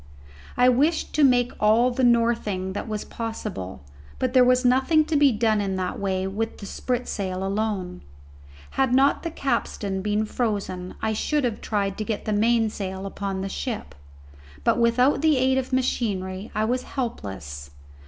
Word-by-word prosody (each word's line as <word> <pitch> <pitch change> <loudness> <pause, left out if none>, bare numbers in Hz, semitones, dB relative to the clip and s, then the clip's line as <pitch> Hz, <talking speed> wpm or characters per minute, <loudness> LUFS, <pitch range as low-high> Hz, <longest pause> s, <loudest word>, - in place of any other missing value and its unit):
I 250 - +5
wished 290 +6 +2
to 305 - +3
make 245 -2 +4
all 225 +4 +4
the 255 +1 -1
northing 230 -6 +2
that 205 - -4
was 215 -1 -4
possible, 210 - -6 0.3
but 255 -1 -1
there 255 -1 +7
was 250 +1 +3
nothing 265 +5 +4
to 315 - -1
be 285 -2 +5
done 215 -1 +1
in 195 -1 -2
that 185 -1 -3
way 190 -1 -1
with 215 +4 -3
the 200 - -9
spritsail 195 -6 -3
alone. 195 - -2 0.7
Had 265 -2 +2
not 275 +2 +4
the 335 - -3
capstan 230 -9 -2
been 210 +2 0
frozen 200 -6 -3
I 220 - +1
should 295 +7 0
have 235 -4 -2
tried 200 -2 -1
to - - 0
get 215 -1 -3
the 215 - 0
mainsail 210 -3 0
upon 195 -1 -4
the 195 - -3
ship, 225 +2 -4 0.7
but - - +2
without 250 +5 +3
the 310 -3 +4
aid 260 +1 +3
of 260 - -5
machinery 205 -6 -1
I 215 +1 +1
was 250 +3 0
helpless. 95 - -5
220 Hz, 165 wpm, -24 LUFS, 195-250 Hz, 0.7 s, there